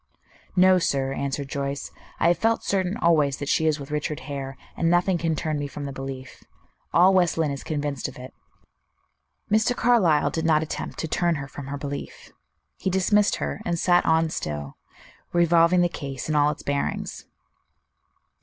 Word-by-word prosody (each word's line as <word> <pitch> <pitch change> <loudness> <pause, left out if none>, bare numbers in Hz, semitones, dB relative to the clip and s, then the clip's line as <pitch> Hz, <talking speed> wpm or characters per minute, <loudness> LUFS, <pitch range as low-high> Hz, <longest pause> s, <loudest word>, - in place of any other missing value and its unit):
"No, 185 0 +6
sir," 135 -5 0
answered 140 0 -3
Joyce; 140 0 -4 0.3
"I 170 - +4
have 175 - +2
felt 225 0 +1
certain 190 +1 0
always 150 -5 +3
that 145 - -5
she 160 - +2
is 155 -1 +1
with 140 +1 -9
Richard 150 0 -2
Hare, 135 -2 -6 0.2
and 165 - +1
nothing 175 +1 +2
can 165 -1 0
turn 155 -1 -2
me 145 - -3
from 145 0 -7
the 140 - -4
belief. 135 -1 -8 0.5
All 180 +3 +5
West 175 -3 +3
Lynne 160 -3 +1
is 140 - -6
convinced 145 -3 -3
of - - -10
it." 125 +1 -10 1.2
Mr. 220 +3 +3
Carlyle 220 -13 +3
did 160 - -2
not 160 -1 +3
attempt 160 - -5
to 160 - -3
"turn 170 +1 +1
her 140 -2 -5
from 140 0 -9
her 145 +1 -4
belief." 140 0 -7 0.5
He - - -1
dismissed 200 +3 +3
her, - - -4
and 170 -3 -1
sat 175 +1 +3
on 160 0 +2
still, 75 - -4 0.6
revolving 170 +1 +4
the 175 - +4
case 135 -6 -6
in 155 - -1
all 145 -1 +4
its 150 - -5
bearings. 140 0 -3
155 Hz, 180 wpm, -25 LUFS, 140-175 Hz, 1.2 s, No